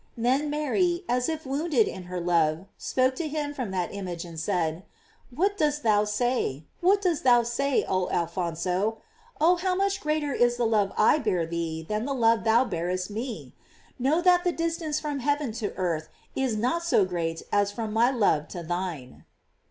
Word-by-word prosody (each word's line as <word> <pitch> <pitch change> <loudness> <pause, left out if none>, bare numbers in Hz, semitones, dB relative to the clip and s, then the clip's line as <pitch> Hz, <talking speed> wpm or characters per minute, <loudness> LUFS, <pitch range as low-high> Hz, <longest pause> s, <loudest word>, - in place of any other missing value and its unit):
Then 260 +6 +1
Mary, 345 +5 0
as 250 +2 +1
if 320 -1 -4
wounded 275 -3 +1
in 185 -1 -6
her 180 0 -4
love, 170 -1 +1
spoke 260 0 +1
to 335 - -2
him 295 -1 -3
from 255 -7 -4
that 185 -1 -2
image 180 -4 -5
and 165 -2 -8
said: 165 -3 -1 0.5
"What 385 +10 0
dost 295 -1 +1
thou 210 -2 +3
say 210 - -1
— - - -39
what 395 +3 +3
dost 345 -5 +1
thou 240 -2 +5
say, 265 +4 0
oh 185 -1 0
Alphonso? 180 +5 -1 0.4
Oh, 345 +4 +4
how 365 +1 0
much 395 +1 0
greater 300 -2 -1
is 240 0 +2
the 240 - +1
love 210 -3 +2
I 305 - +5
bear 180 - 0
thee 165 -1 -4
than 215 +2 -2
the 275 0 -2
love 230 -2 +3
thou 230 +3 +4
bearest 180 -1 -3
me! 230 +2 -5 0.5
Know 285 +7 +2
that 355 -1 +4
the 355 - +2
dis 330 -1 -1
tance 310 -3 -2
from 295 -2 -3
heaven 285 -1 0
to 205 - -2
earth 170 -4 -2 0.3
is 260 -5 0
not 255 +10 0
so 335 - +3
great 165 -3 -3
as 205 0 +2
from 220 0 -4
my 230 +3 +4
love 200 - +1
to 175 - -7
thine." 170 -6 -5
235 Hz, 190 wpm, -26 LUFS, 180-295 Hz, 0.5 s, thou